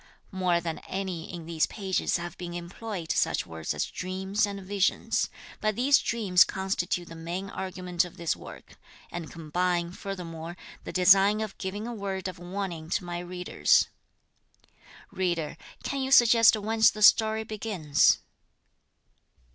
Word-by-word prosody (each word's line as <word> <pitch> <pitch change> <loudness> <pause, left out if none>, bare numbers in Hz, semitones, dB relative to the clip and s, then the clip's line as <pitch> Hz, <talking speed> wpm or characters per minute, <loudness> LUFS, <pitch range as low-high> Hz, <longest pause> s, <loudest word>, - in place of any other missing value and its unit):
More 180 -3 +1
than 165 -1 -4
any 185 -4 -4
in 170 -3 -7
these 165 -1 +1
pages 190 -4 -1
have 175 -1 -6
been 175 -1 -7
employed 175 0 -5
such - - +1
words 80 -1 -5
as 75 - 0
dreams 190 +3 -1
and 200 -1 -5
visions; 195 0 0 0.3
but 215 -1 0
these 270 +5 +4
dreams 200 -6 +4
constitute 185 -2 -2
the - - -10
main 175 +4 -5
argument 180 -2 -2
of 180 - -10
this 170 -1 -1
work, - - -12 0.3
and 170 -4 -6
combine, 175 +2 -1
furthermore, 175 -3 -7 0.3
the - - -5
design 195 +3 +5
of 215 -2 -4
giving 205 +3 -4
a 240 - -4
word 195 -3 -4
of 185 -1 -7
warning 175 -3 -5
to 180 - 0
my 175 0 -4
readers. 180 0 +2 1.2
Reader, 175 -5 -1 0.3
can 275 -1 -2
you 265 - -1
suggest 230 -3 +7
whence 220 +1 +4
the 215 - -3
story 220 +1 +6
begins? 205 -9 +2
185 Hz, 145 wpm, -28 LUFS, 175-205 Hz, 1.2 s, suggest